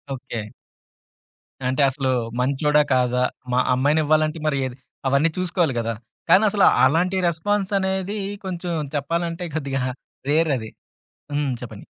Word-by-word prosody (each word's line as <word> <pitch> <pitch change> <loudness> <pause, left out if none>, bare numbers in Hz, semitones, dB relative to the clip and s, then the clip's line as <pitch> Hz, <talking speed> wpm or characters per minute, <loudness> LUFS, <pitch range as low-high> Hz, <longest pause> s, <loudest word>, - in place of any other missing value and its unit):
Okay. 115 -4 -6 1.2
అంటే 130 +3 +1
అసలు 135 -1 -1 0.3
మంచోడా, 145 +3 +3
కాదా? 125 0 +2 0.3
మా 125 - +3
అమ్మాయినివ్వాలంటే 155 +3 +2
మరి 145 -2 +1
ఏది 125 -1 -5 0.3
అవన్నీ 140 +4 +3
చూసుకోవాలి 175 -5 +1
గదా! 115 0 -1 0.4
కానీ 185 +5 +7
అసలు 200 -1 +4 0.2
అలాంటి 180 +6 +2
రెస్పాన్స్ 195 +4 -1
అనేది 190 +2 -2 0.3
కొంచెం 180 -1 -4 0.2
చెప్పాలంటే 170 +4 -2
కొద్దిగా 135 -4 -1 0.5
రేర్ 160 +1 +3
అది 110 -2 -7 0.7
హ్మ్. 145 -1 0
చెప్పండి? 120 - -9
155 Hz, 120 wpm, -23 LUFS, 130-175 Hz, 1.2 s, కానీ